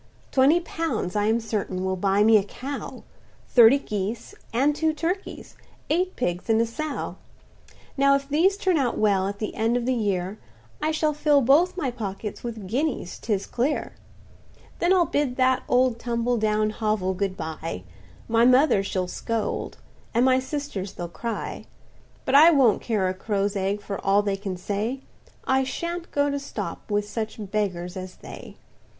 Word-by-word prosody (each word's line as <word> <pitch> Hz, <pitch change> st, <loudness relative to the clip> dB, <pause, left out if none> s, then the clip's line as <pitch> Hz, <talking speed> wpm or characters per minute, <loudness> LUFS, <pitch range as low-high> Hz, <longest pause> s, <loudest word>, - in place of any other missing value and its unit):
"Twenty 280 Hz, +6 st, +5 dB
pounds, 325 Hz, -, -3 dB
I 205 Hz, 0 st, +2 dB
am 225 Hz, +2 st, +2 dB
certain, 205 Hz, -4 st, -3 dB
will 190 Hz, 0 st, 0 dB
buy 195 Hz, +2 st, +2 dB
me 220 Hz, +1 st, +6 dB
a 200 Hz, -, +2 dB
cow, 270 Hz, +7 st, -7 dB, 0.5 s
Thirty 240 Hz, +2 st, +7 dB
geese, 215 Hz, -, -4 dB, 0.2 s
and 275 Hz, +5 st, +2 dB
two 315 Hz, +1 st, +1 dB
turkeys—eight 360 Hz, +1 st, -4 dB
pigs 175 Hz, -3 st, -2 dB
and 220 Hz, 0 st, +4 dB
a 230 Hz, -, +3 dB
sow; 295 Hz, +6 st, -4 dB, 0.8 s
Now 275 Hz, 0 st, +4 dB
if 275 Hz, 0 st, -2 dB
these 340 Hz, +8 st, +3 dB
turn 375 Hz, -4 st, +1 dB
out 250 Hz, -4 st, 0 dB
well, 195 Hz, -3 st, +2 dB
at 200 Hz, 0 st, -4 dB
the 215 Hz, 0 st, -4 dB
end 225 Hz, +2 st, +1 dB
of 240 Hz, -, -2 dB
the 260 Hz, -, +2 dB
year, 200 Hz, -3 st, -1 dB, 0.4 s
I 310 Hz, -, +1 dB
shall 310 Hz, -1 st, +1 dB
fill 295 Hz, -1 st, +3 dB
both 315 Hz, +9 st, +4 dB
my 280 Hz, -8 st, -1 dB
pockets 210 Hz, -3 st, -6 dB
with 225 Hz, -4 st, -6 dB
guineas 245 Hz, -, -2 dB
'tis 200 Hz, -4 st, -1 dB
clear. 270 Hz, +5 st, -1 dB, 0.9 s
"Then 345 Hz, -, +2 dB
I'll 365 Hz, -2 st, +5 dB
bid 285 Hz, -4 st, -1 dB
that 255 Hz, 0 st, +3 dB
old 250 Hz, -1 st, +3 dB
tumble 235 Hz, 0 st, 0 dB
down 215 Hz, 0 st, +1 dB
hovel 210 Hz, -4 st, -1 dB
good 190 Hz, 0 st, -2 dB
bye; 160 Hz, -, -5 dB, 0.4 s
My 230 Hz, 0 st, +3 dB
mother 255 Hz, -3 st, +5 dB
she'll 185 Hz, -2 st, -2 dB
scold, 225 Hz, +3 st, -3 dB, 0.4 s
and 240 Hz, +2 st, +4 dB
my 260 Hz, 0 st, +4 dB
sisters 260 Hz, -8 st, -4 dB
they'll 175 Hz, -1 st, -6 dB
cry: 230 Hz, +6 st, -5 dB, 0.6 s
But 260 Hz, -, -1 dB
I 305 Hz, +4 st, +9 dB
won't 270 Hz, -10 st, +4 dB
care 210 Hz, -5 st, 0 dB
a 185 Hz, -, -1 dB
crow's 200 Hz, +1 st, -1 dB
egg 200 Hz, +1 st, -1 dB
for 200 Hz, -, -5 dB
all 200 Hz, +1 st, +3 dB
they 200 Hz, -1 st, 0 dB
can 195 Hz, -2 st, -5 dB
say; 210 Hz, +8 st, -3 dB, 0.4 s
I 265 Hz, 0 st, +2 dB
sha'n't 340 Hz, +6 st, -4 dB
go 285 Hz, 0 st, +1 dB
to 280 Hz, -, -2 dB
stop 280 Hz, -, -6 dB
with 205 Hz, 0 st, 0 dB
such 220 Hz, 0 st, -4 dB, 0.2 s
beggars 180 Hz, -4 st, -2 dB
as 185 Hz, -1 st, -7 dB
they!" -, -, -11 dB
230 Hz, 170 wpm, -25 LUFS, 200-280 Hz, 0.9 s, I